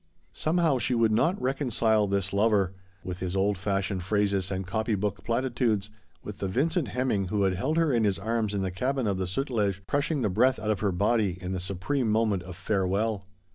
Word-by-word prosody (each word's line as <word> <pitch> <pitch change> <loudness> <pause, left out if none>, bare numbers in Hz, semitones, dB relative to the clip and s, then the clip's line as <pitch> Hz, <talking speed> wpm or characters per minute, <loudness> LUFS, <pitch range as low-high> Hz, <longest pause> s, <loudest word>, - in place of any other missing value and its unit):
Somehow 160 -4 +1
she 120 +2 +1
would 115 -1 +3
not 165 - +2
reconcile 120 -5 +1
this 100 -1 -1
lover, 100 -2 +2 0.3
with 90 -1 -5
his 90 0 -3
old 100 +1 +2
fashioned 95 0 -1
phrases 100 0 0
and 95 -1 -3
copybook 105 -1 -1
platitudes, 115 -4 0 0.3
with 105 - -8
the 100 - -1
Vincent 150 - 0
Hemming 120 -7 0
who 100 +2 0
had 95 -1 +2
held 150 - -1
her 165 -4 +3
in 115 -2 +2
his 100 -3 +2
arms 110 0 -1
in 100 - -1
the 95 - -2
cabin 130 +6 -1
of 100 -3 0
the 95 - -1
Sutlef, 100 -3 -1
crushing 145 -1 0
the 105 - +2
breath 125 +6 +3
out 110 - -1
of 105 - -1
her 100 -2 +1
body 100 0 +1
in 90 0 -5
the 95 - -2
supreme 100 +8 -1
moment 105 -3 +2
of 90 0 -9
farewell. 100 +2 -1
105 Hz, 200 wpm, -27 LUFS, 95-120 Hz, 0.3 s, would